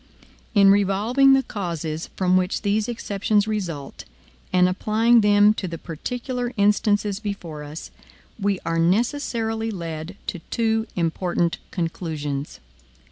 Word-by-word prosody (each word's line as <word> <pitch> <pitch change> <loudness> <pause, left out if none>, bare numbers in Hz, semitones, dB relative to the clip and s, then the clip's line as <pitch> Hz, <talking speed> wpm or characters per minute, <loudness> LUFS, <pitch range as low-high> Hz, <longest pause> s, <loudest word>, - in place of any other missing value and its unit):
In 200 -1 +7
revolving 210 +8 +4
the 270 0 +4
causes 165 - -4
from 185 -1 +2
which 185 +2 0
these 210 +1 +1
exceptions 205 -2 0
result, 175 -10 -4 0.5
and 180 0 +4
applying 220 +5 +3
them 205 0 +5
to 195 - -4
the 165 -1 -5
particular 245 - -4
instances 205 0 +2
before 190 -8 -6
us, 150 +2 -8 0.5
we 200 -1 +1
are 165 0 0
necessarily 225 - 0
led 170 -2 -6
to 180 - -4
two 225 -1 0
important 170 0 0
conclusions. 155 -5 -4
200 Hz, 120 wpm, -23 LUFS, 170-220 Hz, 0.5 s, In